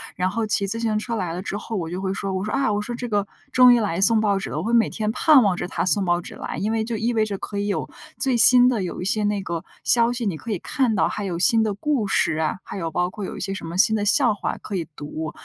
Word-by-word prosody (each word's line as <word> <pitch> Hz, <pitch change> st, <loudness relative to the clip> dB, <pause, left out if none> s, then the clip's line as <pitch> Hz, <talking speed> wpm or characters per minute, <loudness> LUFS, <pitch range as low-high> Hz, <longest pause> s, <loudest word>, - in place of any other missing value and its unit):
然 185 Hz, +1 st, -1 dB
后 225 Hz, +1 st, -2 dB
骑 200 Hz, -1 st, +1 dB
自 225 Hz, +4 st, -1 dB
行 220 Hz, -2 st, 0 dB
车 230 Hz, +2 st, -3 dB
来 180 Hz, -5 st, -3 dB
了 180 Hz, +2 st, -5 dB
之 205 Hz, -, -4 dB
后， 225 Hz, +1 st, -6 dB
我 165 Hz, -3 st, -3 dB
就 185 Hz, +2 st, -4 dB
会 190 Hz, -, -2 dB
说， 195 Hz, 0 st, -3 dB
我 190 Hz, +1 st, -2 dB
说： 215 Hz, -, -4 dB
“啊。 245 Hz, -6 st, +1 dB
“我 205 Hz, -, -1 dB
说：” 240 Hz, +3 st, -5 dB
这 245 Hz, -, -5 dB
个 205 Hz, -2 st, -1 dB, 0.2 s
终 250 Hz, -1 st, +7 dB
于 240 Hz, -, +5 dB
来 190 Hz, -4 st, -2 dB
送 225 Hz, +2 st, +5 dB
报 205 Hz, -2 st, +1 dB
纸 -, -, -5 dB
了。” -, -, -5 dB
我 155 Hz, -, -2 dB
会 230 Hz, +3 st, -2 dB
每 230 Hz, -1 st, +4 dB
天 215 Hz, -1 st, -2 dB
盼 270 Hz, +2 st, +5 dB
望 195 Hz, -3 st, +2 dB
着 175 Hz, -, -4 dB
他 -, -, -2 dB
送 200 Hz, +1 st, +2 dB
报 175 Hz, -1 st, +1 dB
纸 -, -, -9 dB
来， -, -, -6 dB
因 215 Hz, +3 st, -1 dB
为 225 Hz, -1 st, 0 dB
就 225 Hz, 0 st, -3 dB
意 230 Hz, +3 st, -1 dB
味 220 Hz, -1 st, +2 dB
着 205 Hz, -2 st, -3 dB
可 200 Hz, +1 st, -5 dB
以 205 Hz, -, -2 dB
有 200 Hz, -, -2 dB, 0.3 s
最 265 Hz, -3 st, +1 dB
新 245 Hz, +2 st, +7 dB
的 235 Hz, -6 st, +1 dB
有 180 Hz, -, -5 dB
一 180 Hz, -, -4 dB
些 210 Hz, +2 st, +1 dB
那 205 Hz, -1 st, -1 dB
个 170 Hz, -2 st, -4 dB, 0.2 s
消 235 Hz, -1 st, +4 dB
息， 240 Hz, -1 st, -3 dB
你 190 Hz, -6 st, -1 dB
可 225 Hz, -, -7 dB
以 200 Hz, -, -1 dB
看 240 Hz, +3 st, -1 dB
到 -, -, +2 dB
还 210 Hz, -, -4 dB
有 175 Hz, -3 st, -3 dB
新 225 Hz, +5 st, +3 dB
的 215 Hz, -1 st, 0 dB
故 245 Hz, -1 st, -1 dB
事 155 Hz, -4 st, +2 dB
啊， 160 Hz, +3 st, -1 dB
还 -, -, -8 dB
有 165 Hz, -3 st, -3 dB
包 180 Hz, +3 st, -1 dB
括 205 Hz, 0 st, -7 dB
有 -, -, -7 dB
一 -, -, -7 dB
些 195 Hz, -, -3 dB
什 195 Hz, -4 st, -7 dB
么 170 Hz, -, -6 dB
新 220 Hz, +3 st, +4 dB
的 205 Hz, -, -1 dB
笑 235 Hz, +2 st, +4 dB
话 205 Hz, -, -4 dB
可 205 Hz, -, -6 dB
以 170 Hz, -4 st, -3 dB
读。 155 Hz, +1 st, -6 dB
205 Hz, 340 characters per minute, -22 LUFS, 185-230 Hz, 0.3 s, 终